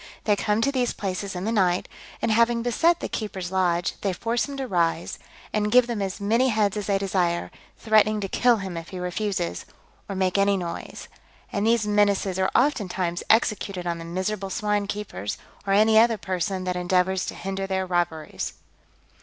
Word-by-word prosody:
They 210 - +3
come 210 +2 0
to 275 - +2
these 255 -3 0
places 195 0 -4
in 180 - -4
the 220 - -1
night, 185 -5 +2 0.4
and - - +2
having 235 +1 +3
beset 330 +8 +2
the - - -2
keeper's 190 -5 -4
lodge, 180 -2 +1
they 195 -2 0
force 230 +8 -1
him 280 - -6
to 270 - -2
rise, 170 -6 0 0.3
and 210 0 0
give 250 +1 +6
them 235 -4 -3
as 195 -1 -3
many 230 +6 +2
heads 215 -3 +1
as 210 -2 -3
they 200 -1 +2
desire, 185 -3 0 0.3
threatening 215 -1 +3
to 195 - -2
kill 240 +4 +3
him 190 -4 -5
if 165 0 -7
he 185 - -7
refuses, 180 - -2 0.5
or 195 - -3
makes 190 +1 +1
any 200 0 +3
noise; 170 -2 -6 0.5
and 205 +1 0
these 230 -2 +3
menaces 205 -2 +2
are 190 - +2
oftentimes 185 -10 +1
executed 210 -5 +2
on 170 -1 -2
the - - -7
miserable 190 +3 -3
swine 210 -1 0
keepers, 200 - -4 0.3
or 195 - +2
any 220 +2 +6
other 230 0 +4
person 185 0 -2
that 180 0 -2
endeavours 180 +1 +1
to - - -5
hinder 195 0 -4
their 190 -1 -1
robberies. 175 -3 -2
195 Hz, 185 wpm, -25 LUFS, 185-215 Hz, 0.5 s, give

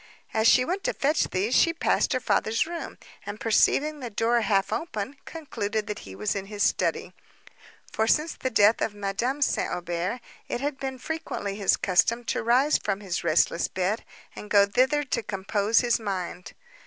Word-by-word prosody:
As 220 0 +3
she 250 +1 +5
went 375 +6 -3
to - - 0
fetch 295 +3 +1
these, 200 +6 -1
she 335 +5 +4
passed 335 - +1
her 255 - +1
father's 225 -2 +1
room, 335 0 -6 0.3
and, 205 +1 -7
perceiving 295 +6 +2
the 250 -3 -5
door 230 +2 +1
half 195 -2 +1
open, 265 -4 -4
concluded 220 -9 -4
that 210 - -5
he 95 - -9
was 105 - -2
in 195 -1 -4
his 205 0 -2
study—for, 220 - -3
since 305 +6 +2
the 260 - -3
death 215 -1 +4
of 210 - -1
Madame 220 +8 -1
St. - - 0
Aubert, 175 +6 -3 0.3
it - - -3
had 280 0 -3
been 265 -1 -4
frequently 310 -10 -4
his 200 -2 +2
custom 225 +6 +2
to - - -2
rise 255 +6 +3
from 195 -1 -2
his 185 -3 -3
restless 170 +1 +2
bed, 190 +4 -2 0.3
and 210 - -9
go 200 -1 +6
thither 260 +8 +2
to 255 -3 -2
compose 205 +2 +1
his 240 -2 +1
mind. 185 -4 -5
220 Hz, 180 wpm, -26 LUFS, 200-265 Hz, 0.3 s, go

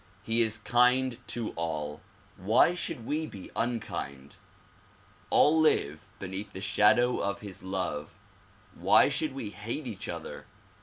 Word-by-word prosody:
He 115 +1 +2
is 110 -1 +1
kind 125 +2 +2
to 115 -2 -2
all; 75 -3 -3 0.3
why 110 - +4
should 170 -9 -5
we 155 +4 -1
be 100 -8 -10
unkind? 70 - -3 0.9
All 160 +2 +5
live 80 - +1
beneath 100 +2 -6
the - - -6
shadow 105 +5 +3
of 100 0 -2
his 100 -3 -7
love; 90 -4 -4 0.6
why 95 +10 +5
should 145 0 -2
we 115 -7 -5
hate 115 +9 -5
each 110 -6 -6
other? - - -7
105 Hz, 135 wpm, -29 LUFS, 95-125 Hz, 0.9 s, All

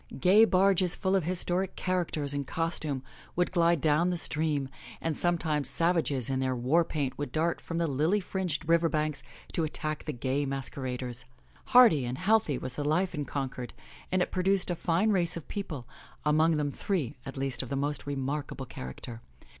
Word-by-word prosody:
Gay 200 +5 +7
barges 190 -3 +3
full 190 -1 +1
of 185 -5 +1
historic 180 +1 -1
characters 170 -6 -1
in 140 0 -1
costume 155 -3 -2 0.3
would 180 0 +1
glide 170 -2 +3
down 155 +4 +3
the 180 - 0
stream, 150 -3 0 0.3
and 160 -2 -2
sometimes 160 -4 +1
savages 165 -7 +1
in 130 -1 -1
their 130 -1 0
war 130 +8 +3
paint 145 -5 -2
would 145 -4 -3
dart 165 +4 0
from 165 - -5
the 170 - +2
lily 155 +7 +2
fringed 180 -5 -2
river 165 0 +4
banks 155 -2 -1 0.3
to 165 - 0
attack 155 0 -2
the 155 - -2
gay 130 +2 -1
masqueraders. 130 -2 -3 0.4
Hearty 245 - +6
and 125 +1 -3
healthy 195 - +2
was 125 - -5
the 145 - -3
life 175 +6 +1
in 150 -3 -3
Concord 130 -2 -4 0.4
and 185 -1 +3
it - - -6
produced 185 0 +1
a - - 0
fine 175 +6 +1
race 175 -4 +1
of 165 - -9
people, 155 - -5 0.4
among 155 +2 +4
them 145 -1 0
three, 160 - -2
at 135 0 -7
least, 135 -1 -1
of 130 - -7
most 145 +1 -2
remarkable 140 0 -3
character. 115 - -8
155 Hz, 180 wpm, -29 LUFS, 140-175 Hz, 0.4 s, Gay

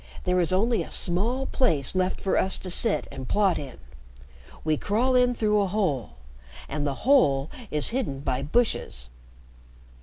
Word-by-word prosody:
There 180 0 +1
is 175 -1 +2
only 220 +5 +2
a - - -6
small 225 +10 0
place 155 - +1
left 185 0 0
for 195 - 0
us 190 - +2
to 185 - -4
sit 225 +4 +1
and 130 -1 -7
plot 195 -6 +2
in. 135 -4 -8 0.9
We 155 -1 +1
crawl 225 - 0
in 250 -1 +3
through 210 -2 +2
a 200 - +1
hole, 180 - -1 0.5
and 145 +1 -2
the 140 - -2
hole 150 - +4 0.2
is 150 -1 0
hidden 225 - -3
by 130 -2 -1
bushes." 140 - -1
185 Hz, 160 wpm, -26 LUFS, 145-225 Hz, 0.9 s, hole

